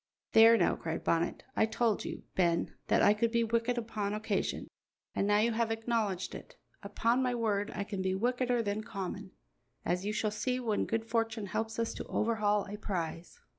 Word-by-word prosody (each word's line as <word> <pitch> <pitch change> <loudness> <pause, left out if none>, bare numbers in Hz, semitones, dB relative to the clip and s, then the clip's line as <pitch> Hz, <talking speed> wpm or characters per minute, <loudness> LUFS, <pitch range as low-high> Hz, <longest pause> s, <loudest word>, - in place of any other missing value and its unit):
"There 225 +1 +8
now," - - +3
cried 160 0 -4
Bonnet, 170 +1 0
"I 220 - +3
told 225 -1 0
you, - - -6
Ben, 170 -2 +1
that - - +3
I 205 - +7
could 225 +2 0
be 235 0 +2
wicked 230 +2 0
upon 210 -3 -2
occasion, 215 -2 -2 0.5
and 200 - 0
now 205 0 +4
you 225 +3 +3
have 230 0 0
acknowledged 225 -4 -1
it. - - -10 0.3
Upon 230 +5 +1
my 250 -1 +1
word, 210 -3 0
I 200 - -1
can 200 -1 -4
be 190 0 0
wickeder 245 +2 +1
than 205 0 -1
common, 195 -3 -5 0.6
as 180 +2 0
you 210 - -1
shall 215 0 0
see 250 +4 -1
when 225 -4 0
good 225 0 -1
fortune 225 -1 -1
helps 220 +3 -3
us 230 0 -1
to - - -5
overhaul 210 -2 +1
a 205 +1 -6
prize." 170 -4 -4
220 Hz, 190 wpm, -32 LUFS, 200-230 Hz, 0.6 s, There